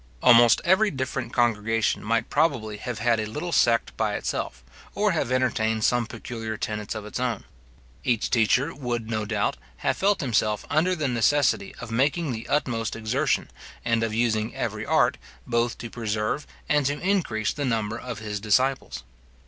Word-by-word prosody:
Almost 120 -1 +7
every 190 +4 +4
different 130 -4 -3
congregation 115 -2 +1
might 115 +2 0
probably 130 -9 +1
have 120 +1 -5
had 115 0 +2
a 110 - -2
little 150 +11 -4
sect 115 -7 +2
by - - 0
itself, 65 -1 -3 0.3
or 210 0 +2
have 155 -7 -1
entertained 110 -4 +1
some 120 -1 +2
peculiar 115 -1 -6
tenets 105 -1 -4
of 110 -1 -6
its 105 - -5
own. 125 -4 -1 0.6
Each 120 -4 +1
teacher, 125 +6 +2
would, 120 -4 -4
no 110 -1 -1
doubt, 105 -1 -1 0.3
have - - +2
felt 200 -1 +2
himself 110 -5 0
under 170 +5 +2
the 155 -4 -1
necessity 120 -3 +2
of 115 - -8
making 140 +6 +1
the 115 -1 -6
utmost 120 -6 0
exertion, 115 +7 0 0.3
and 115 -1 +2
of 115 -1 0
using 110 -1 0
every - - -3
art, - - +3 0.3
both 120 0 0
to 120 -2 -7
preserve 110 +4 -2 0.2
and 150 -1 +3
to 145 +1 -1
increase 175 - 0
the 145 - -3
number 115 -3 -1
of 125 -3 -6
his 105 -1 -4
disciples. 130 - +1
115 Hz, 165 wpm, -25 LUFS, 110-135 Hz, 0.6 s, Almost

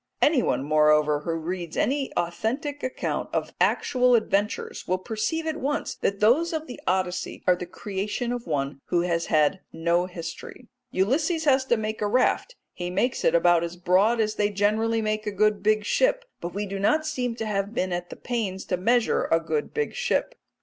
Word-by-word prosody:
Anyone, 280 - +2
moreover, 150 0 +3
who 165 +3 -3
reads 170 +1 -4
any 275 0 0
authentic 240 - -2
account 255 - -3
of - - -2
actual 250 -2 +3
adventures 210 -2 -1
will 185 - +1
perceive 225 - -2
at 315 -1 -2
once 290 -1 -2
that 200 0 -2
those 295 +11 +3
of 315 -1 -2
the 250 - -9
Odyssey 185 -1 -1
are 180 - +5
the 180 0 -7
creation 205 +6 -3
of 245 -4 -4
one 140 -3 -2
who 175 - +1
has 170 -1 -1
had 155 +5 +3
no 170 +2 +1
history. 180 +7 -8 0.2
Ulysses 305 - +1
has 265 -2 +4
to 240 -3 +2
make 215 0 -3
a 210 - +1
raft; 255 - +1 0.2
he 175 0 -4
makes 205 +8 0
it - - +3
about 170 0 +4
as 170 0 -4
broad 190 +7 +3
as 215 -1 +1
they 205 -1 +1
generally 215 +3 +1
make 215 0 -2
a - - 0
good 210 0 +2
big 215 +1 +2
ship, - - +2
but 175 - -5
we 205 +3 -3
do 195 0 -5
not 305 +11 +2
seem 250 -6 -2
to 225 - -4
have 200 +1 -2
been 185 -3 0
at 175 0 -4
the - - -8
pains 215 -6 -3
to 180 - -1
measure 235 +5 +2
a 165 - +3
good 160 -2 -2
big 450 0 -2
ship. 485 +1 0
210 Hz, 190 wpm, -25 LUFS, 175-245 Hz, 0.2 s, are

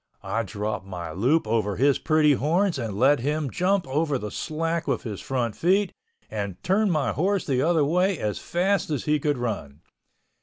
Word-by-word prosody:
I 100 +4 -1
dropped 105 -1 -4
my 85 -4 -6
loop 125 - +2
over 110 -2 0
his 140 +5 +3
pretty 155 -2 +4
horns 165 +5 +1
and 110 -5 -4
let 135 +5 +4
him 145 +1 -1
jump 185 +1 +1
over 145 +1 0
the 105 -4 -6
slack 165 +4 -2
with 135 -4 -1
his 105 -4 -5
front 120 -5 -2
feet, 190 +3 +2 0.3
and 100 -4 -4
turned 200 +2 +2
my 145 -8 +1
horse 190 - 0
the 130 -3 +1
other 160 -1 +3
way 180 +4 +2
as 105 -1 -2
fast 190 +2 0
as 150 -4 -2
he 150 0 +2
could 145 -1 0
run. 100 - -4
140 Hz, 185 wpm, -25 LUFS, 110-165 Hz, 0.3 s, pretty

